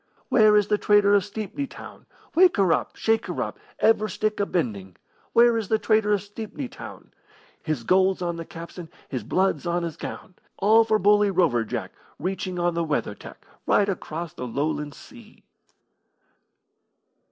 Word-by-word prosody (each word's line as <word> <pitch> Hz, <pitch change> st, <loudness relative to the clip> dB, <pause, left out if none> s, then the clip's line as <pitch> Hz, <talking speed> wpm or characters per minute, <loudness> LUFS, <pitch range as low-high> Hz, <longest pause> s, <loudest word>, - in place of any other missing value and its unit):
Where 215 Hz, -3 st, +5 dB
is 205 Hz, -, +3 dB
the 210 Hz, +1 st, 0 dB
trader 205 Hz, -1 st, +4 dB
of 200 Hz, -2 st, +4 dB
Stepney 215 Hz, +6 st, -5 dB
Town? -, -, -12 dB, 0.3 s
Wake 360 Hz, -2 st, +5 dB
her 190 Hz, -4 st, +4 dB
up! -, -, -2 dB
Shake 225 Hz, 0 st, 0 dB
her -, -, -4 dB
up! -, -, -7 dB, 0.2 s
Every 215 Hz, -1 st, +3 dB
stick 215 Hz, +2 st, -2 dB
a 200 Hz, -, +1 dB
bending! 100 Hz, -, -3 dB, 0.4 s
Where 235 Hz, 0 st, +5 dB
is 215 Hz, -, -5 dB
the 220 Hz, -, +2 dB
trader 215 Hz, 0 st, +2 dB
of 200 Hz, -, 0 dB
Stepney 220 Hz, +6 st, -7 dB
Town? -, -, -11 dB, 0.5 s
His 155 Hz, -7 st, -3 dB
gold's 190 Hz, +5 st, +3 dB
on 175 Hz, -1 st, -2 dB
the 165 Hz, -, -6 dB
capstan, 165 Hz, +1 st, -10 dB, 0.2 s
his 130 Hz, -5 st, -4 dB
blood's 185 Hz, -, 0 dB
on 175 Hz, 0 st, 0 dB
his 165 Hz, -2 st, -5 dB
gown, 185 Hz, -, -8 dB, 0.2 s
All 220 Hz, +3 st, +5 dB
for 220 Hz, -1 st, +2 dB
bully 210 Hz, 0 st, +4 dB
Rover 170 Hz, -11 st, +2 dB
Jack, 115 Hz, -, -5 dB, 0.3 s
Reaching 185 Hz, +1 st, -3 dB
on 175 Hz, 0 st, +1 dB
the 170 Hz, 0 st, -1 dB
weather 150 Hz, -10 st, -1 dB
tack -, -, -13 dB, 0.2 s
Right 200 Hz, -, +3 dB
across 170 Hz, -4 st, -4 dB
the 125 Hz, -, -6 dB
Lowland 145 Hz, +3 st, -2 dB
Sea. 235 Hz, -3 st, -16 dB
190 Hz, 170 wpm, -24 LUFS, 165-215 Hz, 0.5 s, Where